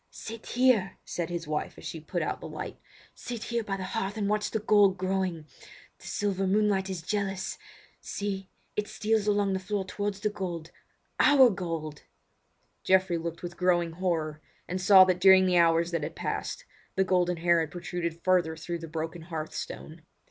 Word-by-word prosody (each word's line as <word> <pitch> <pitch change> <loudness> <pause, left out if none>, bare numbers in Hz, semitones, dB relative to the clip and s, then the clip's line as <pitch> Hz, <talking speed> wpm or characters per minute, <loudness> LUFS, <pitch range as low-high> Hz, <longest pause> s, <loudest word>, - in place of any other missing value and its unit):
"Sit 225 0 -9
here," 240 -7 +2
said 170 -2 -3
his 170 -2 -4
wife 150 0 -3
as - - -11
she 165 - -5
put 155 - -3
out - - -3
the - - -6
light. - - -7 0.3
"Sit 240 -3 -6
here 235 -1 -1
by 195 -2 -3
the 190 - -5
hearth 195 +2 -3
and 205 -2 0
watch 210 0 0
the - - -1
gold 205 -2 +4
growing. 185 -3 -1 0.5
The - - -12
silver 195 -2 -1
moonlight 200 -1 +2
is 180 -4 -4
jealous! 195 0 -2 0.4
See, 195 -2 -4 0.3
it 210 0 -1
steals 215 -1 0
along 205 -1 +2
the 190 - 0
floor 200 +1 -2
towards 205 +1 -3
the 210 - 0
gold—our 205 - +1
gold!" 165 -5 -4 0.8
Geoffrey 185 -2 +3
looked 170 +1 -5
with 175 0 -6
growing 175 -2 +2
horror, 160 -3 -2 0.3
and 185 +1 -3
saw 190 0 +9
that 185 -1 +1
during 190 0 +8
the 180 -1 +4
hours 170 0 +3
that 170 -2 -1
had 150 - -5
passed - - -4 0.3
the 190 - +3
golden 180 -2 +1
hair 170 0 +3
had 160 -2 -1
protruded 170 -1 -4
further 180 -4 +2
through 170 +2 -4
the 165 - -7
broken 160 +1 -4
hearth 160 -2 -5
stone. 160 +1 -7
185 Hz, 180 wpm, -28 LUFS, 170-200 Hz, 0.8 s, saw